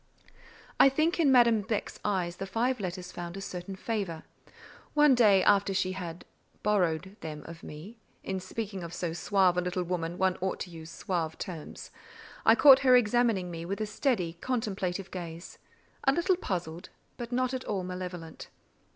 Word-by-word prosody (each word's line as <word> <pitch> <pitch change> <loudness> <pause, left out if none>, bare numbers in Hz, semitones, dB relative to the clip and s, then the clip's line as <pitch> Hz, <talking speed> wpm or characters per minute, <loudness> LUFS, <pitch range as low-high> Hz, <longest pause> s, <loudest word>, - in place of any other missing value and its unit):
I 275 - +8
think 310 +6 +1
in 295 -5 +5
Madame 235 -4 +5
Beck's 215 0 -3
eyes 180 -4 -1
the 195 - -5
five 240 +5 0
letters 185 -1 -5
found 175 +1 -6
a - - -5
certain 185 0 -6
favour. 195 -6 -3 0.7
One 295 -2 +6
day 210 -6 +5
after 200 -1 +3
she 185 -1 +1
had 175 -2 -6 0.4
borrowed 190 -2 0
them 150 -1 -6
of 165 0 -10
me 185 +10 -10 0.2
(in 190 0 -3
speaking 195 +1 -5
of 170 0 -7
so 175 -2 -3
suave 185 0 +2
a - - +1
little 180 0 -2
woman, 175 -1 -3
one 190 -1 +1
ought 190 0 -1
to 180 - -5
use 160 -1 -9
suave 165 -2 -3
terms), 165 -5 -7 0.6
I 225 - +8
caught 270 +1 +8
her 255 -2 +6
examining 225 -6 +2
me 165 -1 -6
with 195 +5 -4
a 215 - 0
steady 200 - -1
contemplative 195 -7 -2
gaze, 170 -1 -7 0.5
a 270 - +6
little 355 +4 +2
puzzled, 175 - -4 0.3
but 240 0 -6
not 255 +1 0
at 260 0 -4
all 195 -3 -2
malevolent. 180 -3 -7
190 Hz, 170 wpm, -29 LUFS, 175-225 Hz, 0.7 s, I